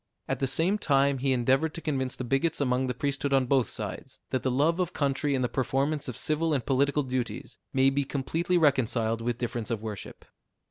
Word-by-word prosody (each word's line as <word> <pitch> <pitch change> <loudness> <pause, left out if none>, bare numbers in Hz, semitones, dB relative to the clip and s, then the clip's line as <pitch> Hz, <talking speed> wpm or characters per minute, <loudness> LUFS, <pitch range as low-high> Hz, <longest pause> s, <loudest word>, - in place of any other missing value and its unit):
At - - -2
the 135 - +1
same 165 +10 +1
time 140 -4 +2
he 135 +1 +1
endeavored 130 +5 +2
to - - -4
convince 135 -5 -1
the - - -5
bigots 135 +6 0
among 130 -1 +1
the 125 - -2
priesthood 140 +1 -1
on 135 -1 +4
both 130 -3 +2
sides, - - -6
that 130 - 0
the 130 - 0
love 150 +7 +2
of 180 -3 -1
country 140 0 0
and 130 - 0
the - - +2
performance 135 +4 -1
of 125 - -5
civil 155 0 +1
and 125 -5 -2
political 140 +2 +2
duties 130 -2 -4
may 135 0 +4
be 140 +1 +1
completely 160 +6 -1
reconciled 120 -7 +2
with 120 0 -1
difference 120 -2 -3
of 115 -2 -2
worship. 105 -4 -7
135 Hz, 205 wpm, -28 LUFS, 125-145 Hz, -, on